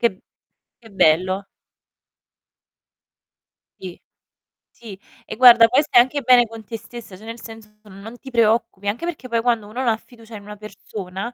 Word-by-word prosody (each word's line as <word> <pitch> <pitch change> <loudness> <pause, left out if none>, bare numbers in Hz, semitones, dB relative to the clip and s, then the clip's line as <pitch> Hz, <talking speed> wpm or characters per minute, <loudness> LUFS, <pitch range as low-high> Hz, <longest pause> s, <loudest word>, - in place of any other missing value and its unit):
Che 235 - +2
b 190 - -18 0.6
che 230 - -17
bello. 185 +2 +1 2.3
Ì, 180 -2 -10 0.7
sì. 205 -5 -13 0.3
E - - -8
guarda, 235 -1 +7
poi 260 +5 +2
stai 270 -5 +5
anche 275 +3 -2
bene 245 -1 +5
con 225 0 -11
te 225 +2 -7
stessa, 225 -3 -12
cioè 210 - -15
nel 230 +1 -8
senso 225 -2 -13
non 210 +3 -12
ti 265 +1 -13
preoccupi. 220 -3 0
Anche 230 +11 -3
perché 320 -7 -6
poi 230 -2 -1
quando 230 -3 -1
uno 230 +4 -8
non 260 - -2
ha 220 - +1
fiducia 230 -1 -16
in 205 - -9
una 210 0 -10
persona, 205 0 -8
225 Hz, 170 wpm, -20 LUFS, 205-240 Hz, 2.3 s, guarda